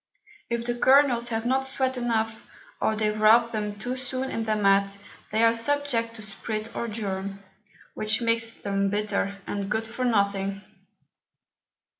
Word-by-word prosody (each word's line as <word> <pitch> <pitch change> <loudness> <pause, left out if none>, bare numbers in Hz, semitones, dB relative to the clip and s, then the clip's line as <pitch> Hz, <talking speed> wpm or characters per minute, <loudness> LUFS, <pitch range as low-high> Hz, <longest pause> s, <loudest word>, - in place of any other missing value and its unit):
If 235 0 -2
the 240 - 0
Kernels 245 -1 +4
have 225 0 -2
not 265 +2 +1
sweat 265 -1 0
enough, 225 -2 -2 0.3
or 220 - +2
they 215 0 +1
wrap 220 +2 +5
them 210 -2 -3
too 245 +4 -3
soon 255 +1 -3
in 225 - -2
the 215 -1 +1
Mat, 200 -1 +3 0.3
they 220 +2 +2
are 230 0 +6
subject 230 -2 0
to 220 - -7
sprit 215 +2 -5
or 235 - -2
germe, 200 -3 -4 0.6
which 215 0 +1
makes 230 -1 +2
them 200 -3 -1
bitter, 200 -1 -1
and 200 -1 -3
good 220 +1 0
for 235 +3 -4
nothing. 200 -3 +1
225 Hz, 155 wpm, -26 LUFS, 205-240 Hz, 0.6 s, are